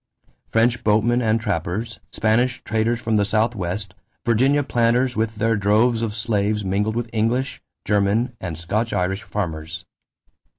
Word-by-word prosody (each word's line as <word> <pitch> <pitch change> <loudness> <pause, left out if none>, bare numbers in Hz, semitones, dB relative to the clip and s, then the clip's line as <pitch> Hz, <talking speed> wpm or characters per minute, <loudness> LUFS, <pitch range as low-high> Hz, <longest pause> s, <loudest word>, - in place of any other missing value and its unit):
French 115 +2 +2
boatmen 110 +3 +3
and 110 -1 +2
trappers, 105 +2 -3
Spanish 120 +3 +1
traders 115 +1 0
from 110 -2 0
the 105 - +3
Southwest, 100 -3 -1 0.3
Virginia 135 +5 +3
planters 120 0 +1
with 110 0 -1
their 115 +2 +1
droves 110 +4 +2
of 110 -2 -2
slaves 105 -2 0
mingled 105 +3 0
with 120 0 -2
English, 120 +5 0 0.2
German, 105 +4 +1
and 85 -4 -4
Scotch 105 +7 -2
Irish 95 +2 0
farmers. 85 -6 -5
110 Hz, 135 wpm, -22 LUFS, 100-115 Hz, 0.3 s, boatmen